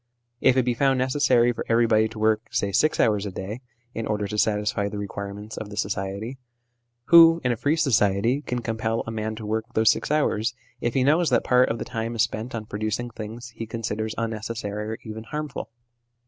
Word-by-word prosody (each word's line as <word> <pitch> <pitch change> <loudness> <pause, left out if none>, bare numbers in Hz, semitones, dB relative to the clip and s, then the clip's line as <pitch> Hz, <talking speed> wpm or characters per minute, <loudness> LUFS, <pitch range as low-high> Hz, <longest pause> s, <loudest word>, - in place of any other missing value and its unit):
If 130 0 +4
it 130 - +4
be 125 - +2
found 135 +2 +2
necessary 130 -2 +3
for - - -4
everybody 115 -1 +4
to 110 0 -11
work, 110 +1 +1
say, 100 - -1
six 155 +10 +2
hours 105 -3 +2
a - - -5
day, 100 +6 -6 0.3
in 115 - -4
order 105 -1 -1
to 100 - -4
satisfy 105 -1 +1
the 105 - -6
requirements 100 +1 -6
of 105 - -6
the 105 - -9
society, 100 +5 -3 0.7
who, 165 0 +9
in 125 - +2
a - - +1
free 145 +7 +1
society, 115 -2 +2
can 125 -4 -4
compel 115 0 -1
a 115 - -5
man 110 0 -3
to 110 -1 -8
work 110 +1 -1
those 110 0 +5
six - - -3
hours, 130 -6 +1 0.2
if 120 - -2
he 130 - +3
knows 155 +5 +3
that 120 -3 +2
part 125 0 +4
of 115 - -1
the - - -5
time 115 -1 -4
is 110 - +3
spent 115 +3 -4
on 110 -2 -4
producing 110 +3 -3
things 115 +3 -7
he 115 0 -7
considers 110 -1 -3
unnecessary 110 -2 -3
or 110 - -4
even 110 0 -7
harmful 150 +2 -5
110 Hz, 205 wpm, -25 LUFS, 105-125 Hz, 0.7 s, who